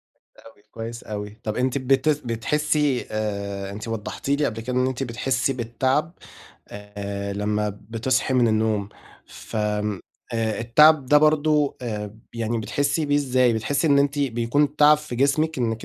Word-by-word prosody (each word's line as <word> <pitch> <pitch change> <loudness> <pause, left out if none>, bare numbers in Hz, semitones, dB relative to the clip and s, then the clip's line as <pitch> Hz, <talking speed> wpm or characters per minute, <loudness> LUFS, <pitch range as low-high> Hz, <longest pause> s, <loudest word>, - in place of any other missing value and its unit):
كويس - - -23
أوي، 115 -2 -17
كويس 115 +1 -7
أوي، 105 -1 -5
طَب 110 -1 -3
أنتِ 130 +2 0
بت 135 +2 +2 0.2
بتحسِّي 145 +3 0
آآ، 100 -2 -3
أنتِ 105 +3 -7
وضّحتِ 115 +3 -5
لي 145 +1 +2
قبل 115 -2 -4
كده 125 +2 -4
إن 125 0 +3
أنتِ 130 0 -3
بتحسِّي 125 +2 -1
بالتعب 130 +6 -1 0.6
آآ، 100 -1 -6
لمّا 105 +1 -1 0.2
بتصحي 125 +3 0
من 120 -2 +4
النوم 110 -2 0 0.4
ف - - -9
آآ، 105 -2 -1 0.6
التعب 145 +5 +5
ده 150 +3 +6
برضه 150 -1 +2
آآ 105 -3 -5 0.2
يعني 115 0 -2
بتحسِّي 145 +7 -1
بيه 145 0 +2
إزاي؟ 130 -3 +2
بتحسِّي 135 +8 0
إن 140 -1 +4
أنتِ 140 +1 +1
بيكون 140 +3 0
تعب 150 0 +7
في 150 -5 -7
جسمِك 145 +4 +1
إنِّك 115 -2 -2
120 Hz, 155 wpm, -23 LUFS, 110-140 Hz, 0.6 s, تعب